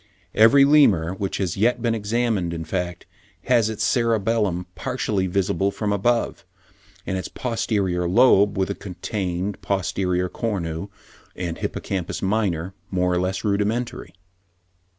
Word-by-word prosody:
Every 135 +6 +6
Lemur 105 - +4
which 95 0 -3
has 95 -4 -1
yet 115 +5 +2
been 115 -2 0
examined, 110 -5 -1
in 80 0 -5
fact, 90 -1 -3 0.4
has 120 -4 +3
its 110 - -3
cerebellum 110 -6 +1
partially 95 +2 -2
visible 95 0 0
from 105 +1 -2
above; 115 0 0 0.6
and 95 - -2
its 90 - -5
posterior 100 -7 -1
lobe, 100 -2 +5
with 95 0 0
the - - 0
contained 95 0 -4
posterior 90 -1 -1
cornu 90 -5 -3 0.5
and 85 -2 -4
hippocampus 95 -1 -3
minor, 95 -3 0 0.2
more 90 -1 +1
or 90 - +1
less 95 +1 -2
rudimentary. 105 +4 -1
100 Hz, 130 wpm, -23 LUFS, 90-110 Hz, 0.6 s, Every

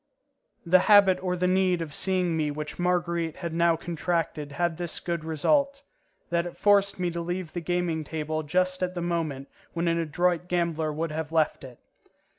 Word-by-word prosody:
The 185 +2 +6
habit 200 -3 +6
or 180 -1 -1
the 180 +1 0
need 185 -1 +2
of 160 -3 -5
seeing 180 -2 +1
me 155 -2 0
which 150 +2 -6
Marguerite 170 -2 0
had 170 -1 -5
now 170 0 +3
contracted 165 -3 -3
had 170 +2 -1
this 175 -2 -3
good 170 -2 -3
result: 275 - +1 0.5
that 170 0 +1
it 175 - -10
forced 200 -1 +3
me 175 -1 0
to 170 0 -4
leave 175 -1 -4
the 175 - -3
gaming 170 -2 -1
table 155 +1 -3
just 185 +4 0
at 180 0 -1
the 175 - -3
moment 160 -6 -2 0.3
when 170 0 -1
an 170 0 +1
adroit 175 +2 0
gambler 170 -3 0
would 160 +2 -3
have 160 0 -4
left 160 -3 +1
it. 125 -3 -11
170 Hz, 185 wpm, -27 LUFS, 160-180 Hz, 0.5 s, The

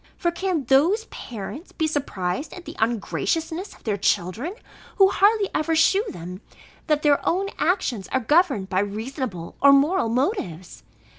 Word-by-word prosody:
For 345 - 0
can 345 -3 -1
those 310 - +3
parents 240 - -8
be 320 - -1
surprised 275 - -2
at 360 - -10
the - - -8
ungraciousness 320 - -1
of - - -22
their 210 -3 -1
children, 215 - -1 0.4
who 390 -2 +6
hardly 410 0 +3
ever 320 +1 0
shew 385 +5 +4
them, 180 +3 -8 0.5
that 300 -2 +1
their 290 -2 +3
own 390 +3 0
actions 255 - 0
are 260 - 0
governed 260 - +2
by 185 -1 0
reasonable 210 - -4
or 280 - +8
moral 280 -1 +3
motives? 225 - -2
280 Hz, 150 wpm, -23 LUFS, 210-345 Hz, 0.5 s, or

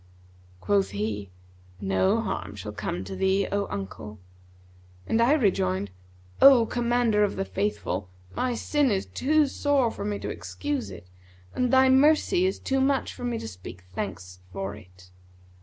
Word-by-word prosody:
Quoth 95 +1 +2
he, 100 0 -3 0.5
'No 105 - +1
harm 100 - -4
shall 105 0 -6
come 105 -3 -4
to 95 0 -7
thee, 190 - +1
O 200 0 0
uncle;' 100 +2 -6 0.9
and 225 - +1
I 245 +5 +5
rejoined, 100 - +1 0.5
'O 265 -4 +8
Commander 235 -3 +1
of 205 - 0
the 195 - -2
Faithful, 195 - -2 0.3
my 250 -1 0
sin 290 +3 +1
is 195 -3 0
too 305 +3 +2
sore 275 -3 +1
for - - -7
me 205 0 -2
to - - -5
excuse 290 -3 -4
it - - -10 0.5
and 250 -1 0
thy 265 0 +6
mercy 265 - +4
is 190 - -2
too 270 0 -1
much 270 0 +1
for 245 - -10
me 240 -1 -1
to - - -6
speak 90 -2 -10
thanks 90 -2 -6
for 95 +1 -4
it.' 90 -2 -17
195 Hz, 155 wpm, -26 LUFS, -, 0.9 s, O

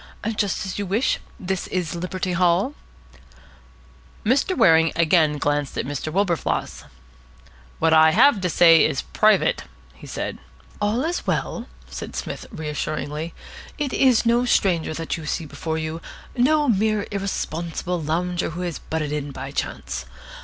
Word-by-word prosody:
"Just 200 -2 -1
as 190 +1 -4
you 200 - -2
wish. 215 +8 +1 0.2
This 190 0 -3
is 180 -3 -2
Liberty 180 +1 -3
Hall." 180 +8 +2 1.5
Mr. 280 - +2
Waring 165 -8 +5
again 160 -2 +3
glanced 145 -1 -1
at - - -1
Mr. 145 +3 -4
Wilberfloss. 180 -4 -1 0.9
"What 160 0 +3
I 160 0 +7
have 210 - +5
to 180 - 0
say 165 0 +6
is 135 - 0
private," 215 - +2 0.3
he - - -13
said. - - -4 0.4
"All 215 +5 +1
is 345 +2 -3
well," - - -2 0.2
said - - -7
Psmith - - -5
reassuringly. 150 +1 -4 0.4
"It 290 -4 -2
is 255 -4 +4
no 235 +1 +3
stranger 175 -9 +1
that 165 +1 -3
you 155 -2 -8
see 165 - -2
before 160 +2 -4
you, 160 +1 -4 0.3
no 295 +4 +3
mere 215 -2 +2
irresponsible 175 -3 -3
lounger 175 +3 -1
who 170 +3 -6
has 175 -3 -3
butted 155 -2 -3
in 150 -1 -3
by 135 0 -7
chance. - - -4
175 Hz, 145 wpm, -23 LUFS, 160-205 Hz, 1.5 s, I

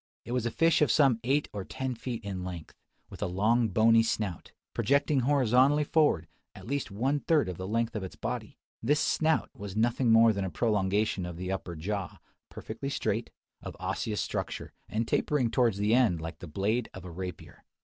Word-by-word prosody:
It - - -7
was 125 -2 0
a - - 0
fish 165 +8 +3
of 150 - +4
some 135 -7 +4
eight 140 +4 +1
or 100 -2 -4
ten 130 +6 -4
feet 115 -1 -5
in 95 -2 -4
length; 90 -4 -7 0.4
with - - -10
a - - 0
long 110 +6 +2
bony 110 +3 +5
snout, 105 -6 -2 0.2
projecting 140 +1 +2
horizontally 135 +2 +3
forward, 145 - +2 0.3
at - - -11
least 140 +3 -2
one 130 +9 0
third 155 0 +2
of 90 -2 -5
the 95 - -4
length 115 +2 -1
of 110 - -2
its 95 - -7
body. - - -5 0.2
This 145 +6 +2
snout 160 +1 +1
was 100 -1 -7
nothing 120 +2 +2
more 115 0 +6
than 100 -1 -2
a 95 - -2
prolongation 105 -1 0
of 90 -1 -6
the 90 +1 -4
upper 95 -2 -4
jaw, 95 +3 -4 0.3
perfectly - - -6
straight, - - -1 0.3
of - - -8
osseous 105 -2 -2
structure, - - -4 0.2
and 110 +1 -1
tapering 130 -6 +1
towards 120 -6 +2
the 105 +2 +2
end 115 -9 +3
like 80 +1 -7
the 90 - -8
blade 105 +9 -1
of 95 -1 -9
a 90 - -7
rapier. 90 +1 -8
110 Hz, 195 wpm, -29 LUFS, 95-130 Hz, 0.4 s, more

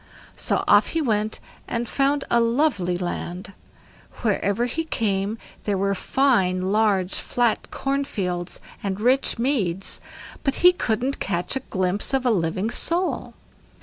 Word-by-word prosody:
So - - 0
off - - +6
he 330 - -1
went 215 -3 0 0.3
and 235 0 -2
found 275 +2 +1
a 235 - +5
lovely 230 - +1
land; 180 +1 -5 0.7
wherever 210 +1 +1
he 320 +7 -2
came 210 -7 -1 0.3
there 205 -2 +1
were 200 +1 +1
fine 190 -6 +2
large 200 -4 +2
flat 240 -3 0
corn 275 +1 -1
fields 180 -7 -3 0.2
and 195 -1 -3
rich 255 +5 +3
meads, 210 -8 0 0.4
but 275 -2 +1
he 360 - +9
couldn't 255 - -1
catch 175 +4 -1
a - - 0
glimpse 190 +6 -1
of 260 -1 0
a 245 - +4
living 185 +3 0
soul. 350 +7 -1
215 Hz, 140 wpm, -24 LUFS, 190-265 Hz, 0.7 s, he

